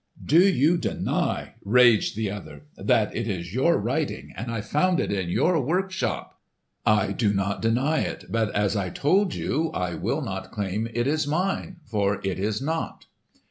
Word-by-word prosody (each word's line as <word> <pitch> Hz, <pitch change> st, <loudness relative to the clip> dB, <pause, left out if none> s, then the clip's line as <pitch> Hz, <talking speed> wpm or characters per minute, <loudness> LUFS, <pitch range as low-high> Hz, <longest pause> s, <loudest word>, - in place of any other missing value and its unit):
"Do 160 Hz, +4 st, +5 dB
you 165 Hz, 0 st, +3 dB
deny," -, -, -1 dB
raged 120 Hz, 0 st, +4 dB
the 110 Hz, -2 st, -1 dB
other, 75 Hz, -8 st, -8 dB
"that -, -, +1 dB
it 115 Hz, 0 st, -2 dB
is 90 Hz, -3 st, -4 dB
your 150 Hz, +8 st, +3 dB
writing 135 Hz, +8 st, -2 dB
and 115 Hz, -, -5 dB
I 115 Hz, -1 st, -2 dB
found 150 Hz, -, +1 dB
it -, -, -1 dB
in 95 Hz, -4 st, -1 dB
your 165 Hz, -, +2 dB
workshop?" 180 Hz, -, -2 dB, 0.5 s
"I 105 Hz, -2 st, +3 dB
do 105 Hz, +1 st, +1 dB
not 100 Hz, 0 st, -1 dB
deny 130 Hz, +8 st, +2 dB
it, -, -, -3 dB
but, 110 Hz, -1 st, 0 dB
as 105 Hz, 0 st, +1 dB
I 95 Hz, -3 st, -1 dB
told 185 Hz, -, +1 dB
you, 160 Hz, +2 st, -1 dB
I 90 Hz, -1 st, -1 dB
will -, -, -2 dB
not -, -, -5 dB
claim 105 Hz, +2 st, -2 dB
it 120 Hz, 0 st, +1 dB
as 155 Hz, +1 st, +1 dB
mine; 180 Hz, +2 st, -2 dB
for 105 Hz, -2 st, 0 dB
it 95 Hz, -1 st, -2 dB
is 105 Hz, +5 st, -1 dB
not." 160 Hz, +2 st, -3 dB
115 Hz, 175 wpm, -25 LUFS, 100-155 Hz, 0.5 s, Do